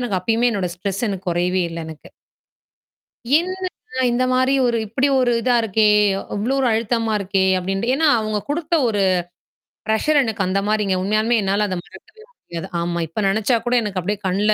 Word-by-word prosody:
எனக்கு 215 Hz, -7 st, -1 dB
அப்பயுமே, 230 Hz, +5 st, +1 dB
என்னோட 185 Hz, -5 st, -2 dB
ஸ்ட்ரெஸ் 195 Hz, +4 st, -3 dB
எனக்குக் 190 Hz, -2 st, -4 dB
குறையவே 180 Hz, +2 st, 0 dB
இல்ல 165 Hz, -, -6 dB
எனக்கு. 160 Hz, -1 st, -11 dB, 1.3 s
என்ன 370 Hz, +1 st, -4 dB, 0.4 s
இந்த 245 Hz, +2 st, +1 dB
மாரி 260 Hz, +1 st, +2 dB
ஒரு, 235 Hz, -1 st, +1 dB
இப்படி 260 Hz, +6 st, +1 dB
ஒரு 245 Hz, -1 st, +2 dB
இதா 245 Hz, +1 st, +2 dB
இருக்கே, 220 Hz, 0 st, +2 dB, 0.5 s
அவ்வளோ 215 Hz, +6 st, -1 dB
ஒரு 260 Hz, -, +2 dB
அழுத்தமா 225 Hz, 0 st, 0 dB
இருக்கே 195 Hz, -1 st, 0 dB
அப்படின்ட்டு. 195 Hz, +5 st, -2 dB
ஏனா, 320 Hz, +2 st, +2 dB
அவங்க 215 Hz, -1 st, -2 dB
குடுத்த 325 Hz, +2 st, -1 dB
ஒரு 205 Hz, -3 st, 0 dB, 0.9 s
ப்ரெஸ்ஸர் 285 Hz, +8 st, +2 dB
எனக்கு 220 Hz, -4 st, -2 dB
அந்த 195 Hz, +2 st, +1 dB
மாரிங்க. 210 Hz, -3 st, +1 dB
உண்மையாலுமே 215 Hz, +4 st, +1 dB
என்னால 200 Hz, +2 st, +1 dB
அதை 185 Hz, -, -3 dB
மறக்கவே 435 Hz, -, -17 dB
முடியாது. 175 Hz, -, -8 dB
ஆமா, 170 Hz, 0 st, -2 dB
இப்ப 165 Hz, +7 st, -4 dB
நெனச்சாக்கூட 230 Hz, +4 st, +1 dB
எனக்கு 200 Hz, -3 st, -3 dB
அப்படியே 205 Hz, +3 st, -2 dB
கண்ணுல 205 Hz, +3 st, +2 dB
215 Hz, 165 wpm, -20 LUFS, 190-240 Hz, 1.3 s, மாரி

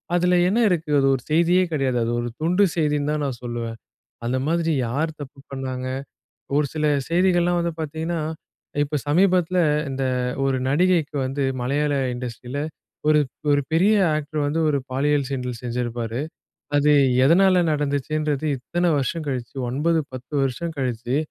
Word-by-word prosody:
அதுல 180 Hz, +1 st, +3 dB
என்ன 205 Hz, +6 st, +2 dB
இருக்கு? 165 Hz, -4 st, -1 dB
அது 135 Hz, -, +3 dB
ஒரு 130 Hz, -, -5 dB
செய்தியே 170 Hz, +4 st, +4 dB
கிடையாது. 135 Hz, -4 st, 0 dB
அது 115 Hz, -, -1 dB
ஒரு 120 Hz, -, -3 dB
துண்டு 175 Hz, +5 st, +3 dB
செய்தின்னு 150 Hz, -3 st, +1 dB
தான் 150 Hz, -1 st, -1 dB
நான் 130 Hz, -4 st, -4 dB
சொல்லுவேன். 120 Hz, -1 st, -4 dB, 0.5 s
அந்த 125 Hz, +2 st, 0 dB
மாதிரி 165 Hz, 0 st, +1 dB, 0.2 s
யார் 155 Hz, +7 st, -2 dB
தப்பு 140 Hz, -1 st, -9 dB
பண்ணாங்க! 130 Hz, -1 st, -4 dB, 0.7 s
ஒரு 150 Hz, -, +3 dB
சில 155 Hz, -1 st, -1 dB, 0.2 s
செய்திகள்லாம் 175 Hz, 0 st, +3 dB
வந்து 170 Hz, -1 st, -1 dB
பார்த்தீங்கன்னா, 160 Hz, +2 st, -3 dB, 0.6 s
இப்போ 145 Hz, +1 st, -4 dB
சமீபத்துல 180 Hz, +2 st, +3 dB, 0.3 s
இந்த 135 Hz, 0 st, -2 dB, 0.4 s
ஒரு 135 Hz, -1 st, +1 dB
நடிகைக்கு 170 Hz, 0 st, +2 dB
வந்து 135 Hz, +2 st, -2 dB, 0.2 s
மலையாள 145 Hz, +4 st, 0 dB, 0.2 s
இண்டஸ்ட்ரில 125 Hz, +2 st, -5 dB, 0.5 s
ஒரு 155 Hz, 0 st, +5 dB, 0.3 s
ஒரு 145 Hz, 0 st, +3 dB
பெரிய 185 Hz, +7 st, +4 dB, 0.2 s
ஆக்டர் 150 Hz, 0 st, -3 dB
வந்து 155 Hz, +3 st, 0 dB
ஒரு 145 Hz, -, +2 dB
பாலியல் 140 Hz, +1 st, +1 dB
சீண்டல் 125 Hz, -3 st, -4 dB
செஞ்சிருப்பாரு. 120 Hz, -1 st, -3 dB, 0.6 s
அது 145 Hz, +1 st, +4 dB, 0.3 s
எதனால 185 Hz, +5 st, +5 dB
நடந்துச்சுன்றது 150 Hz, 0 st, -1 dB
இத்தனை 175 Hz, +7 st, -1 dB
வருஷம் 145 Hz, +4 st, -1 dB
கழிச்சு, 125 Hz, -3 st, -4 dB
9 160 Hz, +6 st, +1 dB
10 130 Hz, +3 st, -9 dB
வருஷம் 150 Hz, +6 st, -2 dB
கழிச்சு 125 Hz, -1 st, -1 dB
145 Hz, 145 wpm, -23 LUFS, 130-165 Hz, 0.7 s, ஒரு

